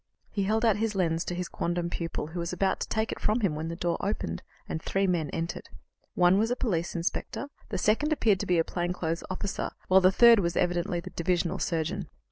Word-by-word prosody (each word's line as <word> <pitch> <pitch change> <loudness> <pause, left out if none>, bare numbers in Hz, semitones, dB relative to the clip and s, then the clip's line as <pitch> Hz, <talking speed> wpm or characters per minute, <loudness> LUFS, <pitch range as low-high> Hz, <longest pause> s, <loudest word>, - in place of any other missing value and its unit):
He 200 -2 -1
held 220 +3 +1
out 220 -3 +4
his 220 -1 -1
lens 165 -3 +1
to 175 - -3
his 180 0 -3
quondam 170 0 -2
pupil, 165 -2 -4
who 175 - -3
was 170 0 -2
about 190 +1 0
to - - -4
take 220 0 0
it - - -5
from 220 +3 +1
him 195 -7 +1
when 155 +2 -3
the 165 - -4
door 170 0 -1
opened, 140 - -2 0.3
and 160 - -3
three 195 +3 0
men 170 -5 0
entered. 165 +3 -4 0.5
One 180 +2 +5
was 225 +2 +2
a 245 - +1
police 180 -10 -1
inspector, 175 +10 -3 0.2
the 200 - -2
second 225 +11 +2
appeared 215 -10 +3
to - - -3
be 180 - +3
a 165 - +4
plain 175 +1 -2
clothes 165 -1 -2
officer, 195 +1 -3 0.2
while 190 +1 +7
the 185 0 +6
third 235 +2 +7
was 170 -3 0
evidently 175 0 0
the 185 +1 -9
divisional 175 0 0
surgeon. 170 +2 -1
180 Hz, 230 wpm, -28 LUFS, 170-200 Hz, 0.5 s, while